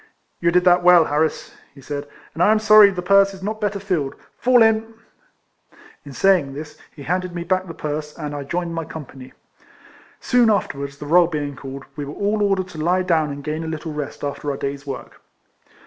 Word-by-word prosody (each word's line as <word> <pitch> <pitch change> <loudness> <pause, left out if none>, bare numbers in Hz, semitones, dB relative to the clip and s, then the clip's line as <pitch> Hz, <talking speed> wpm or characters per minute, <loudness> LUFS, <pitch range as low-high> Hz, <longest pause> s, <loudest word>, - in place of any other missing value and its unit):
"You 170 - +2
did 180 +1 +3
that 180 0 +5
well, 175 -2 +6
Harris," 155 +2 -1 0.2
he - - -14
said, 145 +1 -6 0.3
"and 165 - -4
I 205 - +5
am 220 - +4
sorry 215 -1 +7
the 180 -2 -5
purse 195 +1 +4
is 190 - -12
not 215 +2 -4
better 205 -1 -1
filled. 175 -9 -2 0.2
Fall 245 -2 +5
in." 225 0 +1 1.1
In 145 - -11
saying 150 -3 +2
this, 150 +1 -8 0.2
he 145 - -10
handed 180 +2 -2
me 170 - -3
back 185 +2 -1
the 165 - -8
purse, 150 0 -5
and 150 -2 -5
I 145 - -4
joined 170 +4 -3
my 165 0 -3
com 155 -1 -8
pany. 130 0 -13 0.9
Soon 245 -2 +3
afterwards, 140 -9 -2
the 150 - -8
roll 170 +3 +5
being 145 -4 -4
called, 135 +1 -9
we 145 - -5
were 145 - -8
all 210 +1 -1
ordered 195 -2 +1
to 160 - -9
lie 180 +4 +1
down 160 -4 +1
and 140 0 -7
gain 155 +2 -3
a - - -5
little 160 0 -5
rest 150 -1 -6
after 145 +1 -4
our 140 - -2
day's 140 +1 -5
work. 135 -2 -8
165 Hz, 210 wpm, -21 LUFS, 145-190 Hz, 1.1 s, sorry